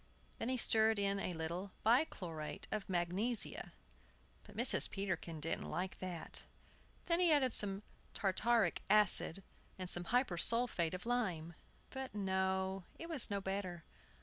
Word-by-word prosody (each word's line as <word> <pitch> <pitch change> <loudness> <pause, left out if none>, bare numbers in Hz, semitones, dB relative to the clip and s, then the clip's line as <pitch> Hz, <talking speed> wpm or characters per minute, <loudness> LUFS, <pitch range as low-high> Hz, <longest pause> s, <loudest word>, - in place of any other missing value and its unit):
Then 230 - -2
he 260 - +1
stirred 220 -2 +3
in 200 0 0
a 180 -3 -3
little 170 +4 -4
bichlorate 180 - 0
of 210 -2 -3
magnesia. 190 +6 -1 0.7
But - - -14
Mrs. - - +4
Peterkin 175 -5 -3
didn't 165 +2 -3
like 185 +1 -3
that. 180 -3 -3 0.6
Then 340 0 +2
he 355 -2 +5
added 265 -5 +3
some 200 0 +2 0.3
tartaric 205 0 +2
acid 200 -3 +4 0.3
and 185 -1 -5
some 175 0 -1
hypersulphate 230 -4 +2
of 180 - -8
lime. 185 -10 -1 0.4
But 265 -3 -6
no; 190 -1 -1
it 335 - -8
was 300 -7 +2
no 200 -1 -1
better. 190 -3 -4
195 Hz, 135 wpm, -37 LUFS, 175-230 Hz, 0.7 s, he